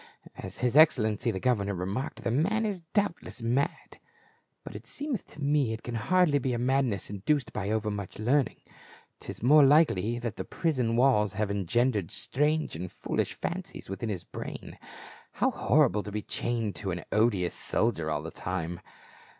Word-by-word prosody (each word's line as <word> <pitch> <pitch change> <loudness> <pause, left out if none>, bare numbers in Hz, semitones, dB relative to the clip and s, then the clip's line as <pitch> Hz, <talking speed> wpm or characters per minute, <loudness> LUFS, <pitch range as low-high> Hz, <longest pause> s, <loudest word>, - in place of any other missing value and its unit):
As - - -7
his 125 +1 +1
excellency 120 -7 +5
the 95 - -2
governor 100 -5 +1
remarked, 95 +8 -4
the - - 0
man 200 - +1
is 200 -4 -2
doubtless 200 - -1
mad; 125 +5 -1 0.6
but - - -9
it - - -9
seemeth 285 - -4
to - - -14
me 140 -5 +2
it 110 - -7
can 120 - -5
hardly 150 +6 +3
be 130 -1 -1
a - - -1
madness 125 -5 0
induced 120 +8 -1
by 100 -2 -3
overmuch 105 -2 -2
learning; 125 +4 +1 0.6
'tis - - -8
more 145 +4 +7
likely 135 - +4
that 120 -3 -4
the 95 - -3
prison 130 - -1
walls 115 -5 +3
have 105 0 -1
engendered 100 +1 +1
strange 150 - 0
and 90 +2 -5
foolish - - -2
fancies - - -5
within 95 +4 -4
his 95 -5 -3
brain. - - -8 0.5
How - - +1
horrible 105 +3 +3
to 105 - -7
be 105 0 -3
chained 115 -4 -2
to 100 - -4
an 85 -2 -3
odious 105 -5 +2
soldier 95 -9 0
all 75 -1 -2
the 80 - -6
time." 85 +2 -4
115 Hz, 165 wpm, -28 LUFS, 100-140 Hz, 0.6 s, more